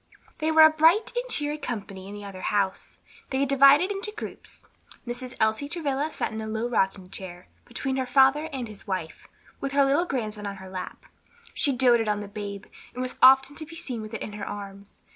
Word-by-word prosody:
They 315 0 +1
were 315 0 +8
a 315 - +8
bright 325 +8 +4
and - - -2
cheery 295 -4 -1
company 200 -8 -6
in 205 - -8
the 205 - -8
other 190 -2 -8
house. 195 -2 -1 0.3
They 265 0 -1
had 280 - +1
divided 275 +7 +6
into 405 +1 -4
groups. - - -9 0.4
Mrs. 245 +1 -5
Elsie 220 +6 +1
Travilla 290 -2 -2
sat - - -3
in 220 0 -5
a 220 - -5
low 220 +2 -2
rocking 190 -5 -1
chair, 180 -2 -8 0.2
between 265 +2 -3
her 260 -1 -1
father 270 +4 +4
and 260 -4 -4
his 215 0 -12
wife, 185 -5 -4 0.3
with 275 0 -4
her 280 0 +4
little 285 +6 +2
grandson 215 -8 -3
on 200 - -5
her 190 -1 -11
lap. 185 -1 -7 0.5
She 285 - +1
doated 240 -3 +3
on 210 0 0
the 205 - -6
babe, 200 -1 -7 0.3
and 250 - -2
was 255 - -5
often 265 +2 +7
to 315 - -5
be 330 - -10
seen 250 -8 -5
with 215 +1 -7
it - - -5
in 210 - -7
her 210 - -6
arms. 200 0 -9
245 Hz, 215 wpm, -26 LUFS, 205-285 Hz, 0.5 s, were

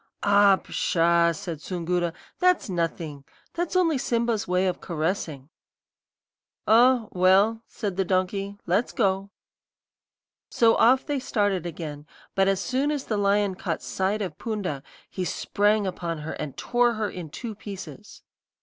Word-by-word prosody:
"'Ah, 200 -1 +6
pshaw!' 170 -2 +2
said 165 -1 -6
Soongoora; 175 -1 -1 0.3
'that's 360 - +2
nothing. 165 -4 -3 0.3
That's 345 +1 -3
only 330 -6 +3
Simba's 235 -3 0
way 180 +1 +2
of 185 - -1
caressing.' 160 -4 -3 1.2
"'Oh, 235 0 +5
well,' 195 +5 +4
said 200 -5 -4
the 195 - +2
donkey, 195 +2 -1
'let's 195 +7 0
go.' 195 -2 0 1.2
"So 230 -1 +4
off 255 +3 +4
they 290 -2 -1
started 205 -8 0
again; 150 -3 -7 0.3
but 195 0 +2
as 195 -1 +2
soon 260 +7 0
as 295 -3 -2
the 215 - -1
lion 200 0 +2
caught 180 -3 -4
sight 200 +3 -1
of 175 -6 -6
Poonda 200 - -3 0.3
he 185 - -4
sprang 205 +3 +1
upon 170 -3 -3
her 160 - -4
and 150 -3 -6
tore 240 0 +2
her 215 -1 -1
in 180 -5 -7
two 225 - -6
pieces. 205 0 -10
195 Hz, 140 wpm, -25 LUFS, 175-220 Hz, 1.2 s, Ah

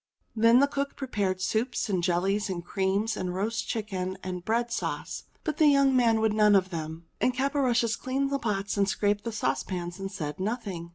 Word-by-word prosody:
Then 230 +2 +6
the - - +6
cook 280 0 -3
prepared 205 -9 -2
soups, 225 +6 0
and 190 -4 0
jellies, 195 +4 +1
and 175 -2 -4
creams, 200 +4 0
and 180 -2 -3
roast 215 +5 -2
chicken, 190 -5 -3
and 180 -1 -4
bread 235 +4 0
sauce; 235 - -3 0.2
but 310 -3 -2
the 310 - +5
young 275 -2 +5
man 230 -3 +4
would 220 -1 +2
none 210 -1 +5
of 185 -1 +2
them. 160 0 -5 0.2
And 255 - +2
Caporushes 255 -5 +2
cleaned 270 +2 -1
the 275 - 0
pots 205 -4 -2
and 200 0 +2
scraped 205 +1 0
the 230 - -2
sauce 220 - 0
pans 175 -1 -5
and 195 0 -4
said 150 -5 -5
nothing. 195 -5 -3
210 Hz, 195 wpm, -28 LUFS, 185-240 Hz, 0.2 s, Then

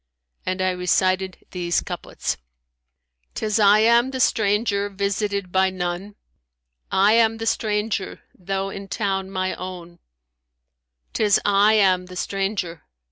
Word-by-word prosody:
And 185 0 -1
I 185 - +2
recited 185 +1 0
these 175 -2 0
couplets, - - -4 1.0
"Tis 215 0 0
I 210 +1 +6
am 235 +3 +4
the 265 -1 -5
stranger, 205 -3 +1
visited 200 -1 -2
by 190 +1 +3
none; 185 +2 -4 0.4
* - - -51 0.2
I - - +5
am 225 -1 +3
the 225 - -5
stranger 210 -2 -1
though 195 +1 -3
in 195 0 -8
town 195 -2 -2
my 185 -1 -2
own: 175 -2 -8 1.1
Tis 210 -2 +3
I 205 +1 +4
am 185 -4 +3
the 180 - -10
stranger! 195 -3 -3
195 Hz, 130 wpm, -22 LUFS, 185-210 Hz, 1.1 s, I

